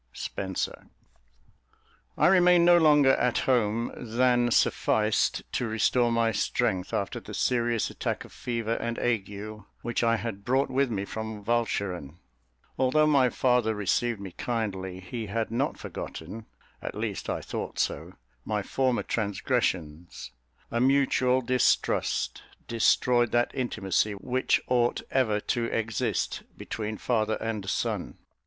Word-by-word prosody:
SPENSER. 95 -2 -4 1.3
I - - +3
remained 180 -2 +6
no 175 0 +7
longer 150 -4 +6
at 125 -1 +1
home 115 -2 +1
than 120 +1 +2
sufficed 110 -2 +2
to 125 - -1
restore 120 +2 +2
my 115 -1 +2
strength, 95 -2 -1
after 100 - -2
the - - -9
serious 120 -2 +1
attack - - -3
of - - -16
fever 115 -2 -2
and 115 0 -3
ague 110 -5 -1 0.5
which 120 0 -1
I 115 0 +3
had 105 -3 -5
brought 130 +3 +1
with 135 0 +2
me 100 -3 -2
from 110 0 -6
Walcheren. 100 -9 -1 0.6
Although 130 +4 +4
my 140 -4 +4
father 125 -3 +2
received 105 +3 0
me 100 -2 -7
kindly, 95 -5 -3
he 110 +4 -5
had 110 +2 -2
not 130 +5 -1
forgotten 105 +8 -7 0.3
(at - - -5
least - - -4
I - - -1
thought - - -5
so) - - -2 0.3
my 105 -2 -2
former 130 +2 0
transgressions; 95 - -2 0.4
a 115 - 0
mutual 130 -1 +3
distrust 125 +1 +1 0.3
destroyed 120 +1 +3
that 120 0 +2
intimacy 105 -5 0
which 125 +6 0
ought 120 -1 +1
ever 110 -6 +2
to 115 +2 -1
exist 115 -2 -1 0.2
between 110 0 -5
father 110 -2 0
and 105 -4 -4
son. - - -2
115 Hz, 130 wpm, -27 LUFS, 105-125 Hz, 1.3 s, no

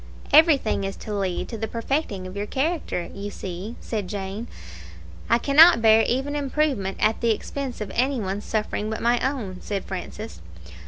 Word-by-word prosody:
"Everything 300 - +5
is 195 0 -3
to 215 - -7
lead 195 -3 -2
to 225 - -6
the 220 - -2
perfecting 230 -4 -2
of 185 +1 -8
your 205 +1 -3
character, 285 - -2
you 200 +1 -5
see," 195 +3 -6
said 210 -5 -4
Jane. 200 +3 -5 0.8
"I 235 - +5
cannot 290 +4 +7
bear 220 0 +6
even 270 +4 -1
improvement 275 -8 0
at 215 +1 +2
the 235 - +2
expense 250 +3 -3
of 200 -2 -4
any 260 +1 +1
one's 200 0 -3
suffering 215 0 -2
but 220 - -3
my 240 +1 +2
own," 230 -9 -3
said 200 -2 -3
Francis. 210 +4 -7
220 Hz, 170 wpm, -24 LUFS, 200-265 Hz, 0.8 s, cannot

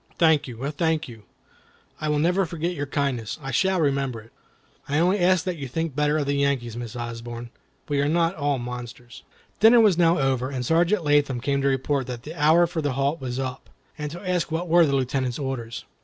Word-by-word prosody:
"Thank 160 -4 +3
you! 125 +1 -6
Oh, 145 - -1
thank 160 0 0
you! 110 -4 -12 0.8
You 155 - -1
will 150 - +1
never 175 +6 +2
regret 170 0 -2
your 145 -4 -4
kindness. 135 -6 -2
I 135 -2 -6
shall 190 +2 +2
remember 135 -5 0
it." 110 +1 -16 0.6
"I 145 - +1
only 180 +5 +3
ask 180 -1 +3
you 185 - -1
to 145 -5 -6
think 160 +2 -3
better 150 +1 +2
of 145 -2 -1
Yankees, 140 -5 0
Miss 120 0 -6
Osborne; 120 0 -6 0.4
we 145 -1 0
are 145 - +1
not 165 +1 +2
all 145 -4 -1
monsters." 120 0 -8 0.4
Dinner 230 +2 +7
was 205 -6 +4
now 170 0 +4
over, 130 -2 0
and 130 -3 -4
Sergeant 170 +6 +2
Latham 145 -4 +2
came 140 +2 0
to 140 - +1
report 135 0 0
that 125 -1 -6
the 155 - -7
hour 160 +2 +4
for 170 -1 -3
the 145 -3 -1
halt 140 +4 -1
was 125 -1 -4
up, 130 -1 -5 0.3
and 150 0 -4
to 175 +5 -8
ask 180 -3 0
what 165 +3 -2
were 170 0 +5
the 140 - +1
Lieutenant's 130 -1 -1
orders. 130 -5 -5
145 Hz, 215 wpm, -24 LUFS, 130-165 Hz, 0.8 s, Dinner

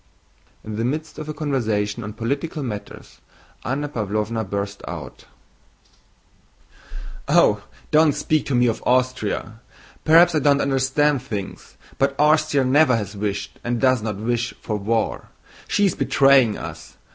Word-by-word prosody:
In 105 -1 -6
the 115 - -1
midst 155 +7 -3
of 155 0 -7
a - - -3
conversation 115 -7 -1
on 105 +1 -6
political 140 +7 -3
matters 105 -5 -8 0.4
Anna 140 +4 -2
Pávlovna 110 -3 -3
burst 100 0 -4
out: - - -8 2.0
"Oh, - - +4 0.3
don't 155 -1 +5
speak 155 +2 0
to 135 - 0
me 120 0 +4
of 115 -2 0
Austria. 125 -3 -1 0.4
Perhaps 165 +2 +6
I 155 - +2
don't 140 0 +3
understand 135 +1 +1
things, 105 -7 -7 0.2
but 135 0 0
Austria 150 -2 +3
never 130 -1 +4
has 105 -1 -5
wished, 100 0 -4
and 120 0 -1
does 130 -2 +3
not 105 -1 -3
wish, 120 +3 -2
for 105 - -4
war. 110 +2 -1 0.4
She 205 - +2
is 195 - +2
betraying 135 -6 +4
us! - - -9
125 Hz, 140 wpm, -22 LUFS, 110-145 Hz, 2.0 s, Perhaps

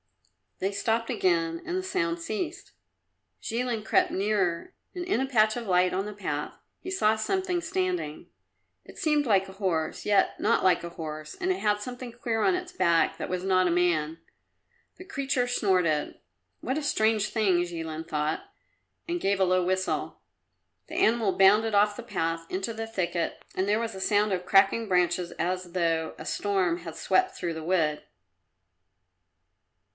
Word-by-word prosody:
They 195 +1 -1
stopped 225 +3 -1
again, 170 -7 +1
and 355 +2 -2
the 375 - -2
sound 170 - -1
ceased. 335 - -4 0.7
Jilin 235 -1 -2
crept - - +3
nearer 195 - 0 0.2
and 360 - -3
in 375 - +1
a 265 - 0
patch 215 -4 +3
of 240 -1 -4
light 180 0 +3
on 190 +2 -1
the 210 - -6
path 150 -8 -4 0.2
he 370 - -7
saw 220 - +3
something 360 - -1
standing. 365 - -2 0.6
It - - -14
seemed 300 -2 +2
like 195 -5 +3
a - - -10
horse, 180 -5 -2
yet 205 -1 +2
not - - +2
like 185 -2 +3
a 170 - -5
horse, 155 - -7
and 375 -1 -1
it 370 - -1
had 210 -1 +1
something 245 +1 -6
queer 230 -1 -2
on 375 - +3
its 365 0 -5
back 170 - +2
that - - -5
was 180 0 -2
not 185 -1 +3
a - - +1
man. 165 -2 +1 0.8
The - - -10
creature 270 -6 -1
snorted. 180 -10 +1 0.4
"What 260 +4 -2
a - - -6
strange 220 -6 +2
thing!" 190 -6 +2
Jilin 165 -2 -5
thought, 150 +1 -1 0.6
and 345 0 -2
gave 200 0 +1
a 190 - +4
low 185 0 +2
whistle. 185 +1 -1 0.7
The - - -7
animal 220 -3 +2
bounded 210 +3 +5
off 205 0 +4
the 240 - -7
path 165 -7 -2
into 190 +5 -3
the 225 0 -5
thicket 175 -6 -2
and 190 +1 0
there 210 +2 +2
was 230 -1 -3
a 190 - -7
sound 205 +1 +2
of 180 -1 -2
cracking 195 +3 +4
branches 180 -1 +1
as 180 0 -3
though 165 -3 0
a - - -9
storm 190 -4 0
had 165 -2 -8
swept 375 - +1
through 170 -2 -3
the 160 -1 -6
wood. 160 -3 +1
195 Hz, 170 wpm, -27 LUFS, 175-235 Hz, 0.8 s, bounded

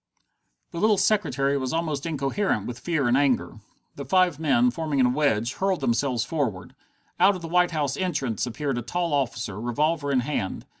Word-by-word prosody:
The 170 - -5
little 215 +1 +3
secretary 140 -10 +1
was 130 +1 -3
almost 160 -2 -2
incoherent 140 - -1
with 120 -1 -6
fear 145 0 0
and 120 - +3
anger. 135 -5 +1 0.4
The 140 - -5
five 180 -3 +2
men, 240 +11 +3
forming 155 - -2
a 125 - +5
wedge, 125 -3 +1
hurled 190 -1 -1
themselves 120 -1 0
forward. 115 - -3 0.5
Out 200 +1 +5
of 180 - -8
the - - -4
White 180 +1 +3
House 145 -5 -1
entrance 140 - -2
appeared 135 +1 -2
a - - -4
tall 170 +7 -2
officer, 115 -7 -2
revolver 145 +5 0
in 130 -2 +2
hand. 120 -8 -3
145 Hz, 180 wpm, -25 LUFS, 125-170 Hz, 0.5 s, a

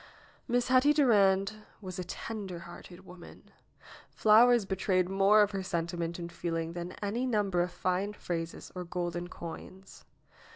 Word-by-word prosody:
Miss 245 0 0
Hetty 260 +3 +5
Durand 205 -7 +3 0.2
was 185 -3 -7
a - - -2
tender 200 -1 -6
hearted 175 +2 -12
woman. 180 -1 -14 0.6
Flowers 230 +1 +5
betrayed 190 -1 0
more 195 +3 +5
of 205 - -1
her 195 -1 -3
sentiment 170 -2 -3
and 170 -1 -7
feeling 165 -1 -3
than 175 +1 -6
any 230 +6 -1
number 205 -6 +1
of 175 - 0
fine 185 +3 -1
phrases 165 -4 -5
or 180 - -5
golden 175 0 -4
coins. 180 +2 -10
190 Hz, 140 wpm, -30 LUFS, 175-210 Hz, 0.6 s, Hetty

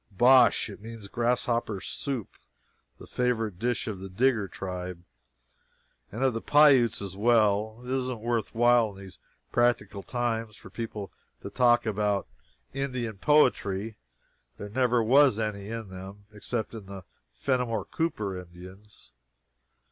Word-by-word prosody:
Bosh. 125 +6 +5
It - - -10
means 110 -2 -9
grasshopper 120 -2 0
soup, 125 +3 -4 0.6
the - - -12
favorite 115 -6 -1
dish 120 +2 -1
of 105 -5 -5
the 95 +1 -8
Digger 110 +1 +1
tribe, 90 -2 -6 1.1
and 115 +6 -3
of 130 -2 +3
the 115 - -3
Pi 150 +1 +6
utes 120 -7 +3
as 95 -1 -6
well. 110 +1 +2
It 125 - -5
isn't 130 -2 -2
worth 115 0 -2
while, 120 -1 +4
in 100 - -13
these 95 -2 -12 0.3
practical 115 -5 +1
times, 115 -2 -2
for - - -14
people 110 -3 -6 0.3
to - - -6
talk 120 -1 +3
about 105 -2 0 0.5
Indian 125 -6 -3
poetry 110 -6 +2 0.6
there 105 - -7
never 120 +1 +2
was 130 0 +5
any 105 -2 -3
in 115 -3 -6
them 95 +2 -10
except 110 +2 -4
in 110 -4 -9
the 95 -1 -9 0.3
Fenimore 115 - -1
Cooper 110 - -2
Indians. 90 +3 -12
110 Hz, 140 wpm, -27 LUFS, 100-120 Hz, 1.1 s, Pi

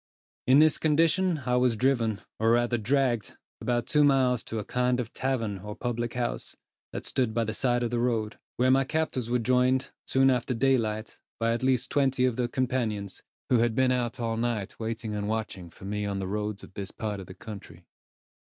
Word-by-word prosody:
In 130 +2 +7
this 155 0 +5
condition 160 +1 +2
I 125 0 +2
was 125 -2 +3
driven, 115 -4 +1 0.2
or 110 +1 +3
rather 120 0 +2
dragged, 120 -2 0 0.2
about 120 -1 0
two 150 -2 +3
miles 130 -4 +3
to 110 - -5
a 105 - -3
kind 125 0 +1
of 120 -1 -4
tavern 115 -7 -1
or 105 +2 -7
public 120 0 -3
house, 120 -1 -3 0.4
that - - -6
stood 120 -4 0
by 115 - +2
the 110 -1 -3
side 120 0 +1
of 120 - -1
the 120 - 0
road; 115 -3 -1 0.2
where 130 +1 +4
my 135 +1 +4
captors 135 -5 -2
were 125 - +2
joined, 125 +2 +2 0.2
soon 135 0 +4
after 125 0 0
daylight, 115 -4 0 0.2
by 115 0 +2
at 120 - -2
least 130 -2 +1
twenty 135 -2 +2
of 125 -3 +1
their 125 0 0
companions, 120 -6 -2 0.3
who 125 - +5
had 115 -1 +2
been 130 0 +3
out 125 -1 -1
all 115 -1 -1
night 115 -4 -2
waiting 115 -1 -3
and 105 -1 -2
watching 105 -5 -3
for 90 - -13
me 105 +1 -2
on 100 -1 -2
the 95 - -3
other 95 - -5
roads 105 -1 -3
of - - -13
this 100 0 -5
part 105 -2 -4
of 95 - -9
the 95 - -10
country. 95 -6 -10
120 Hz, 205 wpm, -28 LUFS, 110-130 Hz, 0.4 s, In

